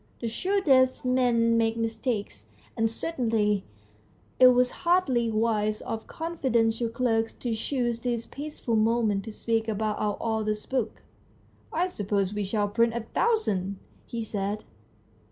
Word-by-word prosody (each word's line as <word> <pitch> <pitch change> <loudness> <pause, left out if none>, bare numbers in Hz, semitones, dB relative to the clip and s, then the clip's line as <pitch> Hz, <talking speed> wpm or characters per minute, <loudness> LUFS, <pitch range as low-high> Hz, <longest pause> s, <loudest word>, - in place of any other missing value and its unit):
The 235 - -3
shrewdest 265 - +2
men 240 -2 +3
make 225 0 +1
mistakes, 225 - -3 0.3
and 225 0 +2
certainly 225 - 0 0.7
it 255 - +9
was 250 0 +4
hardly 300 -10 +2
wise 215 -1 +1
of 220 -1 -5
the - - -13
confiden 270 -9 +1
tial 230 0 -2
clerk 225 -2 +1
to 240 -2 -2
choose 240 0 -1
this 235 -1 -2
peaceful 285 -5 -4
moment 215 -2 +2
to 220 - -6
speak 225 +1 -1
about 215 0 -1
our 210 -1 0
author's 215 -2 -1
book. 255 -4 -2 0.7
"I 345 +3 +1
suppose 205 - -1
we 210 0 -1
shall 205 +1 0
print 230 +2 +2
a 235 - -1
thousand? 215 - 0 0.2
" - - -31
he 230 -1 -4
said. 205 0 -3
230 Hz, 145 wpm, -27 LUFS, 215-250 Hz, 0.7 s, it